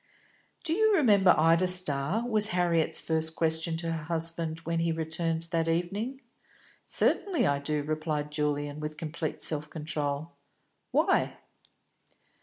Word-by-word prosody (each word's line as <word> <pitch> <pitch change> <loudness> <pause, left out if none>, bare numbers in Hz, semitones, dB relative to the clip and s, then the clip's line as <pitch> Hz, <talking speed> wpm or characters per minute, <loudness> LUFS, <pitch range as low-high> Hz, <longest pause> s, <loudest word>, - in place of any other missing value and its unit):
"Do 325 - 0
you 435 +3 +3
remember 205 - +4
Ida 165 +3 +3
Starr?" 180 +4 +2
was 215 -3 +6
Harriet's 175 -4 +1
first 160 0 0
question 160 0 0
to 165 0 -3
her 165 -2 -4
husband 165 -1 +1
when 165 0 -2
he 165 0 0
returned 160 0 -1
that 165 -1 0
evening. 200 +11 -2 0.7
"Certainly 385 -5 +1
I 140 0 +1
do," 150 +1 -2
replied 155 -1 -3
Julian, 145 -1 -2
with 155 0 -6
complete 160 0 -5
self 150 -1 0
control. 150 0 -4 0.6
"Why?" - - +1
165 Hz, 130 wpm, -28 LUFS, 155-175 Hz, 0.7 s, was